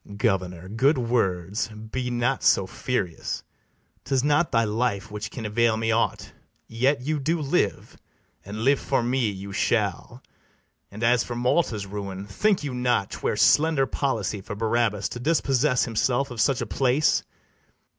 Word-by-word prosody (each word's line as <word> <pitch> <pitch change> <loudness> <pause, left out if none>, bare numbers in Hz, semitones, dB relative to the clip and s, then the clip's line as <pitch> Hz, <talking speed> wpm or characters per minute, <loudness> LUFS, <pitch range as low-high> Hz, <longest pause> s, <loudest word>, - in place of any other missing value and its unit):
BARABAS. 100 - -11
Governor, 95 -5 -1
good 135 +8 +2
words; 105 -5 0
be 110 +3 -5
not 125 +2 0
so 95 - +4
furious 95 -5 -3 0.6
'Tis 135 -2 0
not 150 +3 +2
thy 115 -1 +3
life 105 -2 -1
which 105 0 -5
can 115 - -7
avail 110 +1 +2
me 115 0 0
aught; 115 +1 -1 0.3
Yet 130 +4 +1
you 150 +3 -1
do 160 +5 0
live, 140 - -1 0.5
and 105 +3 -6
live 135 +2 +4
for - - 0
me 120 -1 +1
you 100 0 -7
shall: - - -1 0.7
And 105 +3 -8
as 120 +1 +4
for 120 - -6
Malta's 120 -4 +1
ruin, 100 -1 -6
think 195 - +1
you 140 -3 -3
not 125 -5 0
'Twere - - -2
slender 150 -3 +4
policy 110 -8 -2
for 105 +2 -7
Barabas 110 -3 0
To 120 - -6
dispossess 135 -2 +2
himself 125 +4 0
of 115 -3 -2
such 135 -1 +2
a - - -1
place? 130 +8 +2
120 Hz, 155 wpm, -25 LUFS, 105-135 Hz, 0.7 s, so